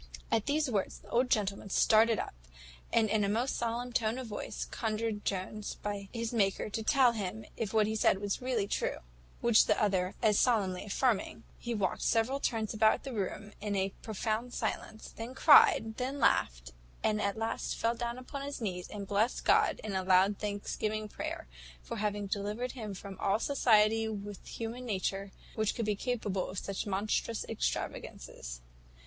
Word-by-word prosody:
At 220 Hz, +1 st, +1 dB
these 295 Hz, +1 st, +2 dB
words 210 Hz, -6 st, -1 dB
the 205 Hz, -, -17 dB
old 245 Hz, +4 st, +2 dB
gentleman 200 Hz, -2 st, 0 dB
started 220 Hz, +3 st, +5 dB
up, -, -, -4 dB, 0.6 s
and 225 Hz, -1 st, +4 dB
in 210 Hz, 0 st, +2 dB
a 200 Hz, -, +1 dB
most 235 Hz, +6 st, 0 dB
solemn 240 Hz, +1 st, -2 dB
tone 225 Hz, 0 st, +1 dB
of 260 Hz, -, -4 dB
voice, 210 Hz, -3 st, -5 dB
conjured 220 Hz, -1 st, -2 dB
Jones 200 Hz, +2 st, -3 dB
by 200 Hz, -1 st, -4 dB
his 230 Hz, 0 st, -3 dB
Maker 200 Hz, -2 st, +1 dB
to 225 Hz, -, -2 dB
tell 255 Hz, +1 st, +5 dB
him 215 Hz, -1 st, -4 dB
if 215 Hz, -4 st, -3 dB
what 220 Hz, -1 st, +4 dB
he 220 Hz, +1 st, -1 dB
said 210 Hz, -, +4 dB
was 205 Hz, +2 st, -2 dB
really 245 Hz, -5 st, 0 dB
true; -, -, -1 dB, 0.4 s
which 235 Hz, -2 st, +6 dB
the -, -, +3 dB
other 190 Hz, -3 st, +1 dB
as 210 Hz, -2 st, +4 dB
solemnly 200 Hz, -7 st, +2 dB
affirming, 225 Hz, +1 st, 0 dB, 0.2 s
he 240 Hz, -1 st, -3 dB
walked 195 Hz, -4 st, -1 dB
several 235 Hz, +4 st, +2 dB
turns 225 Hz, -5 st, -1 dB
about 220 Hz, 0 st, +3 dB
the 270 Hz, -, -5 dB
room 205 Hz, 0 st, -4 dB
in 205 Hz, -1 st, -2 dB
a 195 Hz, 0 st, 0 dB
profound 220 Hz, +3 st, -2 dB
silence, 220 Hz, -, -4 dB
then 230 Hz, +3 st, -6 dB
cried, 225 Hz, -7 st, +6 dB
then 260 Hz, +3 st, -2 dB
laughed, 60 Hz, -, +2 dB, 0.3 s
and 215 Hz, -1 st, +2 dB
at 200 Hz, +1 st, -1 dB
last 225 Hz, 0 st, -2 dB
fell 230 Hz, +1 st, +1 dB
down 235 Hz, 0 st, -3 dB
on 265 Hz, +2 st, -7 dB
his 280 Hz, +1 st, -5 dB
knees, 180 Hz, -6 st, -3 dB
and 205 Hz, -2 st, -6 dB
blessed 215 Hz, +5 st, +1 dB
God, -, -, +4 dB
in 215 Hz, -2 st, -4 dB
a 190 Hz, -, +1 dB
loud 190 Hz, +2 st, +4 dB
thanksgiving 210 Hz, +1 st, -2 dB
prayer, -, -, -5 dB, 0.4 s
for -, -, -5 dB
having 205 Hz, -1 st, -1 dB
delivered 210 Hz, +5 st, -2 dB
him 215 Hz, -6 st, -6 dB
from 195 Hz, 0 st, -9 dB
all 200 Hz, +1 st, +2 dB
society 225 Hz, -4 st, +3 dB
with 205 Hz, -2 st, -6 dB
human 230 Hz, +2 st, -5 dB
nature, 195 Hz, -1 st, -2 dB, 0.2 s
which 220 Hz, -1 st, 0 dB
could 230 Hz, -, -1 dB
be 210 Hz, -1 st, +1 dB
capable 210 Hz, -5 st, -2 dB
of 195 Hz, -, -7 dB
such 195 Hz, +2 st, -3 dB
monstrous 210 Hz, +3 st, -1 dB
extravagances. -, -, -4 dB
215 Hz, 180 wpm, -32 LUFS, 200-230 Hz, 0.6 s, which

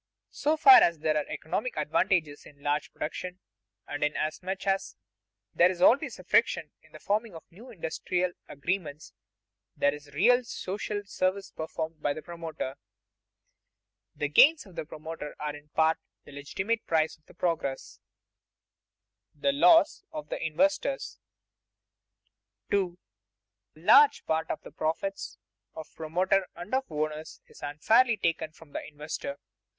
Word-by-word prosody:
So 305 Hz, +2 st, 0 dB
far 375 Hz, +3 st, +9 dB
as 170 Hz, -1 st, +3 dB
there 155 Hz, 0 st, 0 dB
are 150 Hz, -, 0 dB
economic -, -, -3 dB
advantages 160 Hz, -7 st, 0 dB
in 140 Hz, -1 st, -18 dB
large 145 Hz, +1 st, -1 dB
production, 180 Hz, +3 st, -5 dB, 0.5 s
and 145 Hz, 0 st, -3 dB
inasmuch 160 Hz, +6 st, -2 dB
as 195 Hz, 0 st, 0 dB, 0.6 s
there 175 Hz, -, +5 dB
is 180 Hz, -1 st, -4 dB
always 240 Hz, +9 st, +4 dB
friction -, -, +2 dB
in -, -, -24 dB
the -, -, -11 dB
forming 210 Hz, -1 st, -1 dB
of 165 Hz, -, -9 dB
new 225 Hz, +9 st, -13 dB
industrial 180 Hz, -2 st, -2 dB, 0.2 s
arrangements, 150 Hz, 0 st, -4 dB, 0.6 s
there 145 Hz, 0 st, +3 dB
is 150 Hz, 0 st, -10 dB
a -, -, -17 dB
real 245 Hz, -, +4 dB
social 205 Hz, -1 st, -4 dB
service 195 Hz, 0 st, -1 dB
performed 160 Hz, 0 st, -5 dB
by 145 Hz, -, +1 dB
the 155 Hz, -, -8 dB
promoter. 165 Hz, -6 st, -6 dB, 1.4 s
The 145 Hz, -, -1 dB
gains 295 Hz, -, +6 dB
of 190 Hz, -4 st, -16 dB
the 160 Hz, -2 st, -4 dB
promoter 155 Hz, 0 st, -7 dB
are 150 Hz, 0 st, -3 dB
in 145 Hz, 0 st, -14 dB
part 160 Hz, +1 st, +2 dB, 0.3 s
the -, -, -13 dB
legitimate 190 Hz, +11 st, -3 dB
price 160 Hz, -1 st, +1 dB
of 155 Hz, -, -21 dB
progress. 160 Hz, -6 st, -2 dB, 1.4 s
[Sidenote: -, -, -28 dB
The 280 Hz, -, +4 dB
loss 325 Hz, +4 st, +5 dB
of 305 Hz, -2 st, -7 dB
the -, -, -4 dB
investors] 295 Hz, -, 0 dB, 1.5 s
2. 185 Hz, -3 st, +1 dB, 0.8 s
_A 160 Hz, +3 st, -17 dB
large 435 Hz, -, +6 dB
part 160 Hz, 0 st, -1 dB
of -, -, -3 dB
the -, -, -11 dB
profits 165 Hz, +5 st, -3 dB, 0.4 s
of 160 Hz, -1 st, -9 dB
promoter 180 Hz, +4 st, +1 dB
and 175 Hz, +6 st, -9 dB
of 265 Hz, -5 st, 0 dB
owners 155 Hz, 0 st, -4 dB
is -, -, -17 dB
unfairly 220 Hz, -, +3 dB
taken 165 Hz, -3 st, -1 dB
from 155 Hz, -1 st, -17 dB
the -, -, -5 dB
investor. 155 Hz, -, -6 dB
170 Hz, 145 wpm, -28 LUFS, 155-205 Hz, 1.5 s, far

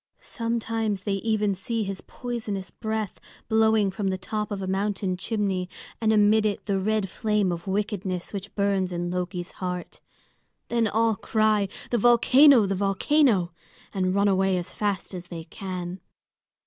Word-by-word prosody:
Sometimes 225 Hz, -3 st, -2 dB
they 200 Hz, -, -1 dB
even 210 Hz, -1 st, +1 dB
see 220 Hz, +4 st, -2 dB
his 195 Hz, -1 st, -5 dB
poisonous 215 Hz, -7 st, -5 dB
breath 220 Hz, -2 st, -3 dB, 0.3 s
blowing 220 Hz, -2 st, +3 dB
from 200 Hz, 0 st, -3 dB
the 190 Hz, 0 st, 0 dB
top 210 Hz, +3 st, -3 dB
of 205 Hz, -2 st, -3 dB
a 190 Hz, -, -3 dB
mountain 195 Hz, 0 st, -1 dB
chimney, 190 Hz, -2 st, -2 dB, 0.3 s
and 220 Hz, -1 st, +3 dB
amid 215 Hz, 0 st, +4 dB
it 210 Hz, -2 st, -1 dB
the 200 Hz, -2 st, 0 dB
red 215 Hz, 0 st, 0 dB
flame 210 Hz, 0 st, 0 dB
of 170 Hz, +2 st, -5 dB
wickedness 195 Hz, -2 st, -2 dB
which 200 Hz, 0 st, -6 dB
burns 200 Hz, -2 st, +1 dB
in 175 Hz, 0 st, -2 dB
Loki's 180 Hz, 0 st, -3 dB
heart. 180 Hz, -1 st, -5 dB, 0.7 s
Then 235 Hz, -1 st, +2 dB
all 225 Hz, +1 st, +2 dB
cry, 215 Hz, -1 st, +2 dB, 0.2 s
"The 240 Hz, -, +2 dB
volcano, 245 Hz, +2 st, +6 dB
the 195 Hz, -, 0 dB
volcano!" 195 Hz, -, +2 dB, 0.4 s
and 185 Hz, -1 st, 0 dB
run 200 Hz, +1 st, +3 dB
away 190 Hz, -1 st, +2 dB
as 175 Hz, -, -5 dB
fast 205 Hz, -2 st, -2 dB
as 180 Hz, -1 st, -7 dB
they 170 Hz, -2 st, -7 dB
can. 180 Hz, +1 st, -6 dB
200 Hz, 155 wpm, -26 LUFS, 185-220 Hz, 0.7 s, volcano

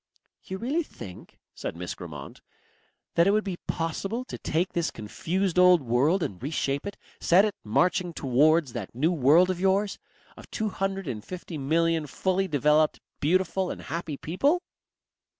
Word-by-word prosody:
"You 190 Hz, -, -6 dB
really 270 Hz, -, 0 dB
think," 95 Hz, -, -11 dB, 0.2 s
said -, -, -5 dB
Miss 90 Hz, +1 st, -5 dB
Grammont, 75 Hz, -6 st, -9 dB, 0.7 s
"that 170 Hz, +2 st, +4 dB
it -, -, +5 dB
would 215 Hz, 0 st, +2 dB
be 190 Hz, -3 st, -4 dB
possible 195 Hz, +9 st, -2 dB
to -, -, -7 dB
take 170 Hz, +4 st, -1 dB
this 170 Hz, -2 st, 0 dB
confused 180 Hz, -, -2 dB
old 180 Hz, -4 st, +6 dB
world 140 Hz, +10 st, +2 dB
and 95 Hz, -, -5 dB
reshape 140 Hz, +2 st, -2 dB
it, 200 Hz, -, -6 dB, 0.2 s
set 185 Hz, +4 st, +5 dB
it 210 Hz, -, -1 dB
marching 180 Hz, -, +1 dB
towards 145 Hz, 0 st, +3 dB
that 115 Hz, -3 st, -6 dB
new 155 Hz, +7 st, +2 dB
world 165 Hz, +4 st, +5 dB
of 180 Hz, -, -4 dB
yours 195 Hz, +1 st, +1 dB, 0.4 s
of -, -, -13 dB
two 215 Hz, -1 st, -2 dB
hundred 195 Hz, -2 st, -3 dB
and 110 Hz, -5 st, -4 dB
fifty 180 Hz, -3 st, -7 dB
million 160 Hz, +2 st, +1 dB
fully 190 Hz, +6 st, 0 dB
developed, 150 Hz, 0 st, +3 dB, 0.2 s
beautiful 185 Hz, +3 st, +1 dB
and -, -, -6 dB
happy 165 Hz, -3 st, -4 dB
people?" 280 Hz, -, +1 dB
170 Hz, 160 wpm, -27 LUFS, 140-190 Hz, 0.7 s, old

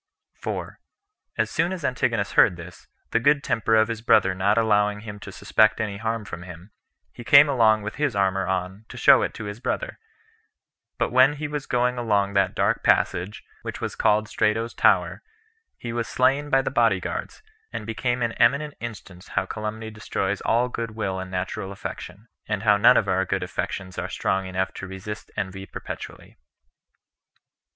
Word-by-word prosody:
4. -, -, -6 dB, 0.6 s
As -, -, 0 dB
soon 170 Hz, +2 st, 0 dB
as 180 Hz, -6 st, -4 dB
Antigonus 115 Hz, -5 st, 0 dB
heard 90 Hz, -, +4 dB
this, 85 Hz, +1 st, -12 dB, 0.2 s
the 115 Hz, -, +3 dB
good 140 Hz, +4 st, +3 dB
temper 115 Hz, -2 st, +1 dB
of 110 Hz, 0 st, +4 dB
his 115 Hz, -1 st, -4 dB
brother 95 Hz, -4 st, +4 dB
not 100 Hz, +3 st, +1 dB
allowing 105 Hz, -2 st, +2 dB
him 105 Hz, -1 st, -8 dB
to 100 Hz, -, -9 dB
suspect 110 Hz, +2 st, +2 dB
any 105 Hz, -3 st, -2 dB
harm 110 Hz, 0 st, -3 dB
from 85 Hz, -, -7 dB
him, 90 Hz, +2 st, -11 dB, 0.4 s
he 120 Hz, -, -10 dB
came 140 Hz, +5 st, +8 dB
along 110 Hz, -6 st, +3 dB
with 105 Hz, -, -6 dB
his 150 Hz, -5 st, 0 dB
armor 95 Hz, -1 st, +1 dB
on, 95 Hz, +2 st, -3 dB
to -, -, -10 dB
show -, -, +6 dB
it -, -, -1 dB
to -, -, -7 dB
his 105 Hz, +1 st, -6 dB
brother; -, -, -3 dB, 1.0 s
but -, -, 0 dB
when 130 Hz, +3 st, +5 dB
he 150 Hz, +1 st, -4 dB
was 145 Hz, -1 st, -5 dB
going 125 Hz, 0 st, +1 dB
along 100 Hz, -4 st, +1 dB
that 95 Hz, -1 st, +1 dB
dark -, -, +1 dB
passage 95 Hz, +4 st, +1 dB, 0.2 s
which -, -, -6 dB
was -, -, -4 dB
called 105 Hz, 0 st, +2 dB
Strato's 110 Hz, +3 st, 0 dB
Tower, -, -, +2 dB, 0.6 s
he 120 Hz, -1 st, -6 dB
was 120 Hz, -1 st, -2 dB
slain 135 Hz, +3 st, +1 dB
by 135 Hz, -1 st, +3 dB
the -, -, -2 dB
body -, -, +3 dB
guards, -, -, -6 dB, 0.3 s
and -, -, -5 dB
became 120 Hz, +2 st, -1 dB
an 115 Hz, -, 0 dB
eminent 140 Hz, +5 st, +3 dB
instance 100 Hz, -6 st, -9 dB
how 95 Hz, -, -1 dB
calumny 110 Hz, +2 st, -5 dB
destroys 100 Hz, -2 st, -3 dB
all 120 Hz, +2 st, +2 dB
good 115 Hz, -3 st, -5 dB
will 95 Hz, -4 st, -2 dB
and 95 Hz, 0 st, -6 dB
natural 95 Hz, +1 st, -4 dB
affection, 100 Hz, +1 st, -8 dB, 0.2 s
and 105 Hz, -1 st, -2 dB
how 105 Hz, -2 st, +5 dB
none 100 Hz, -, +6 dB
of -, -, +1 dB
our 95 Hz, 0 st, +1 dB
good 95 Hz, -, -2 dB
affections 95 Hz, -1 st, -4 dB
are 90 Hz, +1 st, -4 dB
strong 95 Hz, 0 st, -1 dB
enough 95 Hz, 0 st, -2 dB
to 95 Hz, -, -7 dB
resist 95 Hz, +3 st, -8 dB
envy 95 Hz, -1 st, -4 dB
perpetually. -, -, -9 dB
105 Hz, 180 wpm, -24 LUFS, 95-120 Hz, 1.0 s, came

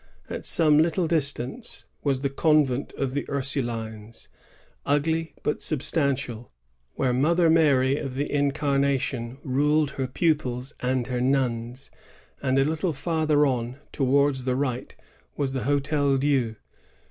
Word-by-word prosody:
At -, -, -3 dB
some 155 Hz, -3 st, +4 dB
little 170 Hz, +2 st, +2 dB
distance 155 Hz, -, -2 dB, 0.2 s
was 135 Hz, -2 st, +1 dB
the 140 Hz, -, 0 dB
convent 145 Hz, -3 st, +2 dB
of 135 Hz, -2 st, -3 dB
the 145 Hz, -, -1 dB
Ursulines, 115 Hz, -6 st, -3 dB, 0.5 s
ugly 160 Hz, +2 st, 0 dB
but 150 Hz, -, -1 dB
substantial, 140 Hz, -5 st, 0 dB
^ 120 Hz, -, -17 dB, 0.5 s
where 130 Hz, -2 st, +1 dB
Mother 165 Hz, +6 st, +3 dB
Mary 140 Hz, -4 st, +3 dB
of 135 Hz, -3 st, -5 dB
the 145 Hz, +2 st, -1 dB
Incarnation 140 Hz, -3 st, 0 dB
ruled 145 Hz, +2 st, +2 dB
her 135 Hz, -1 st, -3 dB
pupils 135 Hz, -3 st, -1 dB
and 125 Hz, -1 st, 0 dB
her 125 Hz, 0 st, -2 dB
nuns; 125 Hz, -1 st, -1 dB, 0.5 s
and 130 Hz, -1 st, +1 dB
a 135 Hz, -, +4 dB
little 160 Hz, +3 st, -1 dB
farther 155 Hz, 0 st, +1 dB
on, 125 Hz, -2 st, -2 dB
towards 135 Hz, -1 st, +1 dB
the 130 Hz, -1 st, +1 dB
right, 130 Hz, -2 st, -3 dB, 0.4 s
was 140 Hz, -2 st, -1 dB
the 135 Hz, -, -1 dB
Hdtel 140 Hz, 0 st, +1 dB
Dieu. 130 Hz, -5 st, +1 dB
140 Hz, 135 wpm, -25 LUFS, 130-150 Hz, 0.5 s, some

